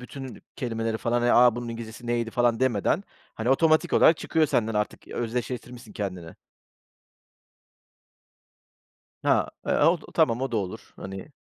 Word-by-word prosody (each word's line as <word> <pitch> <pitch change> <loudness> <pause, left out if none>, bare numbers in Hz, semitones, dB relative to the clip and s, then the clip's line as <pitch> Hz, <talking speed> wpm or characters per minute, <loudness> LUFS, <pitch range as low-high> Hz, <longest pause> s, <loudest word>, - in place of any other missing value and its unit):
bütün 130 +1 -9
kelimeleri 115 -2 -2
falan, 120 0 0
eee, 120 - +3
a 120 -1 +6
bunun 120 -1 -5
İngilizcesi 115 +1 -8
neydi 120 -1 -1
falan 120 0 +1
demeden, 130 - +1 0.3
hani, 115 +2 -3
otomatik 155 +3 +3
olarak 160 - +6
çıkıyor 160 -2 +1
senden 115 -4 0
artık. 105 0 -3
Özdeşleştirmişsin 120 0 -5
kendini. 90 -5 -5 2.9
Ha, - - +2 0.2
eee, - - +2
o 175 - +3 0.2
tamam 125 -7 +3
o 135 - -1
da - - +1
olur, 95 -3 -5
hani? 95 +8 -8
120 Hz, 135 wpm, -26 LUFS, 110-125 Hz, 2.9 s, a